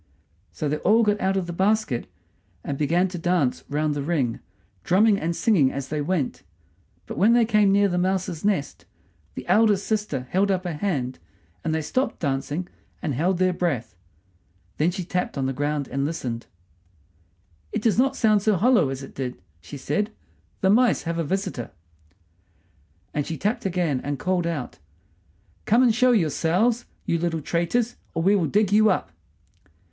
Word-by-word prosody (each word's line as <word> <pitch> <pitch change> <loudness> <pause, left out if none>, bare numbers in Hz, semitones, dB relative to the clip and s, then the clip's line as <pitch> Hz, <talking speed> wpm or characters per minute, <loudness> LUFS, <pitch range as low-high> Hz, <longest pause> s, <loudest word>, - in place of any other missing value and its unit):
So 150 - -3
they 150 +1 0
all 220 +8 +3
got 210 -1 +1
out 190 +1 +1
of 190 - -1
the 175 - -5
basket, 195 - 0 0.6
and 140 - -3
began 170 +6 +2
to 180 -1 -6
dance 170 -7 0
round 150 +1 0
the 145 - -3
ring, 140 -6 -1 0.4
drumming 200 +2 +4
and 170 +1 -2
singing 170 - +3
as 135 -1 -5
they 150 -1 -2
went. 155 -2 -1 0.6
But - - -6
when 215 +4 +5
they 240 -1 +5
came 210 -3 +3
near 200 +1 +4
the 180 -2 0
mouse's 185 -2 -1
nest 200 -8 -1 0.5
the - - -6
eldest 210 -3 +3
sister 210 - -2
held 195 +2 +2
up 185 -1 0
her 175 -2 -3
hand, 145 - -2 0.4
and 165 - -1
they 160 - -1
stopped 255 - -1
dancing 145 +4 -2 0.3
and 155 -5 -2
held 175 +8 +1
their 185 0 +2
breath. 140 - -2 0.8
Then 155 +3 +2
she 180 0 -4
tapped 180 -3 -2
on 135 - 0
the 135 - -1
ground 145 0 -2
and 135 +2 -2
listened. 125 -7 -4 1.2
"It - - -3
does 225 -1 +2
not 270 +1 +3
sound 215 -5 +3
so 215 0 +2
hollow 210 - +3
as 135 0 -5
it 135 - -10
did," 125 -4 -5 0.2
she 90 +12 -9
said, 205 +9 -1 0.5
"The 190 - +4
mice 245 +3 +3
have 170 0 -2
a - - +1
visitor." 185 - -3 1.4
And 145 -1 -2
she 160 - -4
tapped 205 - -1
again, 170 -8 0
and 145 0 -2
called 180 0 0
out, 155 -7 -4 0.9
"Come 235 +4 +4
and 240 -3 +4
show 250 +2 +4
yourselves, 200 - +1 0.2
you 170 - 0
little 165 -1 -1
traitors, 195 - -1 0.2
or 165 - 0
we 195 +3 +4
will 175 -5 +1
dig 205 +2 +2
you 215 +1 +5
up!" 180 - -1
175 Hz, 175 wpm, -24 LUFS, 145-205 Hz, 1.4 s, when